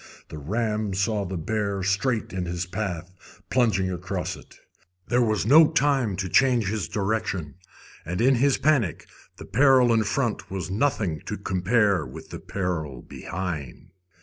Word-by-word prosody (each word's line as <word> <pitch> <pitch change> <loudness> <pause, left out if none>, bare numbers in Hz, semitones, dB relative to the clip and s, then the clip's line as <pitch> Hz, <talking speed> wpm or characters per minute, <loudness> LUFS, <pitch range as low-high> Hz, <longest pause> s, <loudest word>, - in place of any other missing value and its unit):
The 75 - -7
ram 105 +4 -1
saw 100 +1 0
the 95 0 -4
bear 100 +2 -2
straight 105 +3 0
in 90 -1 -2
his 85 0 -3
path, 90 -2 -4 0.4
plunging 105 -7 +2
across 90 0 -3
it. - - -16 0.5
There 125 +1 +2
was 110 -4 +1
no 155 +7 +8
time 135 - +2
to 95 0 -3
change 120 +1 +3
his 105 -7 -2
direction, 100 -7 -2 0.5
and 90 +3 -4
in 130 +4 +4
his 140 +2 +3
panic 130 - +1 0.3
the - - -9
peril 130 +2 +4
in 110 -1 +3
front 115 +3 -1
was 95 -1 -4
nothing 100 - 0
to - - -3
compare 95 -1 +1
with - - -10
the - - -6
peril 80 -9 -4
behind. 85 -7 -6
100 Hz, 150 wpm, -25 LUFS, 90-115 Hz, 0.5 s, no